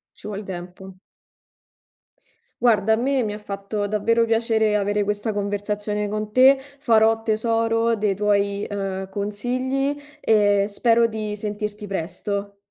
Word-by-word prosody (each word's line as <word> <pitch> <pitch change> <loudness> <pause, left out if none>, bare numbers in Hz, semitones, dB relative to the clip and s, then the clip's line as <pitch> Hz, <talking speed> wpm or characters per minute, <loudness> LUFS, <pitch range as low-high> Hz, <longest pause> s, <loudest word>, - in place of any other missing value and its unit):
Ci - - -11
vuol 210 0 -5
tempo. 185 0 -8 1.7
Guarda, 220 -3 +4
a - - +5
me 260 +2 +1
mi 210 - -2
ha 210 - -7
fatto 205 0 -4
davvero 230 +3 +2
piacere 225 -1 +2
avere 205 0 +1
questa 210 +2 -2
conversazione 205 +1 -2
con 215 +1 -4
te, 260 +4 +6
farò 225 -5 +2
tesoro 225 +1 +1
dei 210 -2 0
tuoi, 200 0 0
uhm, 195 -1 -4
consigli 255 +8 -2 0.2
e 205 -4 +3
spero 230 +2 +3
di 215 -2 -4
sentirti 210 0 -5
presto. 200 +2 -4
210 Hz, 130 wpm, -23 LUFS, 200-225 Hz, 1.7 s, te